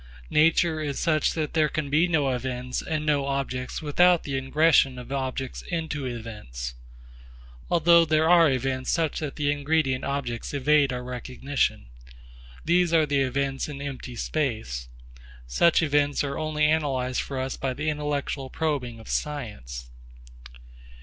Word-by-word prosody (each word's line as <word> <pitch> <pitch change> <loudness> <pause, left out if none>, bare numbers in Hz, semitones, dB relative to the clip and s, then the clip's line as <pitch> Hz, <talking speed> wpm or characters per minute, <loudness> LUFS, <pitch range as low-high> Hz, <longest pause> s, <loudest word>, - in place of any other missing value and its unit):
Nature 160 +1 +3
is 145 -3 -3
such 155 -3 +1
that 155 -2 -2
there 155 -2 +3
can 155 -1 -2
be 155 +5 +3
no 150 -6 +1
events 125 0 -3
and 155 -1 -3
no 145 -2 +1
objects 135 0 -3
without 175 +4 +4
the 140 - -6
ingression 135 -1 +3
of 125 +1 -10
objects 130 -1 -3
into 160 -5 -3
events. 105 - -6 1.0
Although 170 0 +5
there 155 0 +2
are 170 -2 +6
events 130 0 -1
such 165 -3 0
that 150 -3 -4
the 145 -1 +1
ingredient 145 -2 0
objects 140 -2 -3
evade 145 0 +3
our 125 0 -4
recognition. 125 - -2 0.8
These 175 0 +3
are 160 -1 +5
the 145 -1 +1
events 135 +2 -1
in 140 -2 -7
empty 135 -3 -6
space. 110 - -2 0.6
Such 155 - +3
events 145 -1 +2
are 140 -1 -3
only 155 -1 0
analysed 135 -5 +1
for 135 - -6
us 130 0 -2
by 130 -2 -3
the 155 +3 -4
intellectual 145 -2 -2
probing 135 -8 -2
of 110 - -13
science. 65 - -4
140 Hz, 145 wpm, -26 LUFS, 130-155 Hz, 1.0 s, are